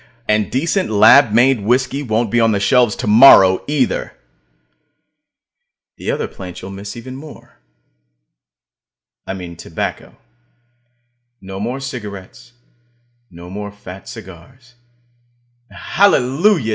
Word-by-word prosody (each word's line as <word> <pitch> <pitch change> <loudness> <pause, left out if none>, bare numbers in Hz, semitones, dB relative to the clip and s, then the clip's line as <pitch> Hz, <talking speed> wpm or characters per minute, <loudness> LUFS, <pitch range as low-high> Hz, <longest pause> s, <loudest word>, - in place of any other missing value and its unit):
and 105 -1 0
decent 170 +8 -1
lab 110 +4 +6
made 120 +3 +3
whiskey 125 +6 0
won't 110 -3 -1
be 120 - +2
on 115 -1 +3
the 100 - 0
shelves 120 +1 +2
tomorrow, 105 -4 +6
either. 140 -4 -1 1.8
The - - -3
other - - -3
plant 90 -1 -10
you'll 95 - -9
miss 100 +1 -8
even 130 +2 -9
more. 150 +3 -13 1.7
I - - -3
mean 90 -3 -8
tobacco. - - -6 1.3
No 95 0 -8
more 120 +6 -4
cigarettes; 110 -4 -9 0.8
no 85 0 -12
more 105 +1 -6
fat 95 -2 -12
cigars 115 +4 -13 1.0
and - - -15
hallelujah! 165 - +2
115 Hz, 110 wpm, -17 LUFS, 100-130 Hz, 1.8 s, lab